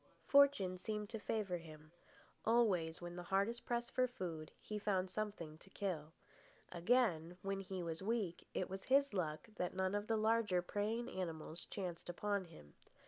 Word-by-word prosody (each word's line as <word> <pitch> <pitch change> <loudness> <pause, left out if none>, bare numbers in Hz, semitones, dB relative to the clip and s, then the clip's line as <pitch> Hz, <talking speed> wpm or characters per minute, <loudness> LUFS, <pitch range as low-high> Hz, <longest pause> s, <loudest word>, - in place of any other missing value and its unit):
Fortune 275 -11 +5
seemed 210 0 -3
to 225 - -3
favour 205 -4 -1
him. 155 -1 -12 0.5
Always, 185 -9 +3
when 175 0 -5
hardest 200 +6 0
pressed 240 0 0
for 255 0 +3
food, 170 -10 -5
he 210 0 -4
found 190 -3 +1
something 185 -7 -3
to 195 - -16
kill. 170 -7 -3 0.6
Again, 175 -3 +2
when 195 0 -1
he 190 -2 -4
was 165 0 -3
weak, 205 -4 -1
it 185 - 0
was 190 0 -6
his 275 -1 +4
luck 160 0 -1
that 180 0 -1
none 190 0 +1
of 205 +1 -1
the 225 - +2
larger 215 -4 +3
preying 215 +5 -1
animals 170 -5 -4
chanced 180 -4 -4
upon 200 +2 0
him. 75 - -14
190 Hz, 160 wpm, -39 LUFS, 175-215 Hz, 0.6 s, Fortune